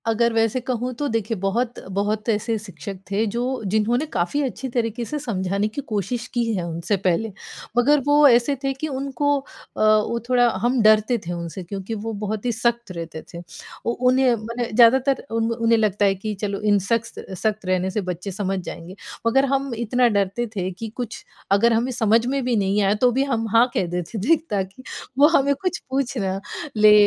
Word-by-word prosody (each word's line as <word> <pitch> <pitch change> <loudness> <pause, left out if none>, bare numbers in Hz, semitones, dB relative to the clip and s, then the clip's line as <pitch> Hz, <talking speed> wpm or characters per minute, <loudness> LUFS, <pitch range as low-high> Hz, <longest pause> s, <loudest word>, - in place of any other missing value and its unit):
अगर 230 +1 +2
वैसे 225 +2 +2
कहूँ 250 0 -1
तो 290 - 0
देखिए 225 -2 -1
बहुत 225 +6 -1 0.2
बहुत 210 +2 -1
ऐसे 220 +1 0
शिक्षक 190 -2 -8
थे 210 +3 +1
जो 235 - -1 0.3
जिन्होंने 235 +6 +2
काफ़ी 180 +12 0
अच्छी 260 0 -4
तरीके 235 -1 -2
से 300 +5 -4
समझाने 200 -5 -1
की 215 +7 -5
कोशिश 215 +3 -2
की 240 -2 +1
है 185 -4 -1
उनसे 170 +4 -1
पहले। 190 +3 0 0.5
मगर 290 +5 +5
वो 290 0 +6
ऐसे 245 +2 +4
थे 275 - +1
कि 270 +4 -4
उनको 280 +1 0
अ, - - -13 0.4
वो 215 +2 +3
थोड़ा 245 -1 +4
हम 240 +1 +2
डरते 215 +2 +4
थे - - -2
उनसे 170 +1 -6
क्योंकि 195 +4 -6
वो 220 +2 -4
बहुत 210 +2 -3
ही 245 - +2
सख्त 235 -1 -1
रहते 165 -2 -6
थे। 170 - -6 0.4
ओ 235 - +1 0.2
उन्हें 255 -1 +4
मने 235 +2 -4
ज़्यादातर 255 +4 +5
उन 225 0 0
उन्हें 230 0 +2
लगता 210 -2 +2
है 195 -1 +3
कि 210 +3 -4
चलो 200 -1 -2
इन 205 - +5
सख्तस 230 -3 -3
सख्त 215 -2 0
रहने 185 0 +1
से 210 - -1
बच्चे 180 +3 -4
समझ 195 0 -2
जाएँगे, 175 0 -8 0.3
मगर 270 +4 +4
हम 275 -2 0
इतना 240 +2 +2
डरते 200 +5 0
थे 185 -2 -1
कि 220 +5 -7
कुछ 240 -3 -5 0.3
अगर 230 +4 +4
हमें 235 +3 +1
समझ 225 -1 +2
में 275 +1 0
भी 245 -1 +1
नहीं 200 0 +1
आया, 195 0 +3
तो 245 +3 +3
भी 265 +3 +1
हम 235 -5 -1
हाँ 235 +2 +6
कह - - +1
देते 175 +5 -4
थे 330 - +7
ताकि 195 +4 -3 0.3
वो 285 +2 +7
हमें 280 +1 +2
कुछ 365 -2 -1
पूछ 265 0 -1
ना 195 -2 -1 0.4
ले 215 0 +7
225 Hz, 195 wpm, -22 LUFS, 200-245 Hz, 0.5 s, थे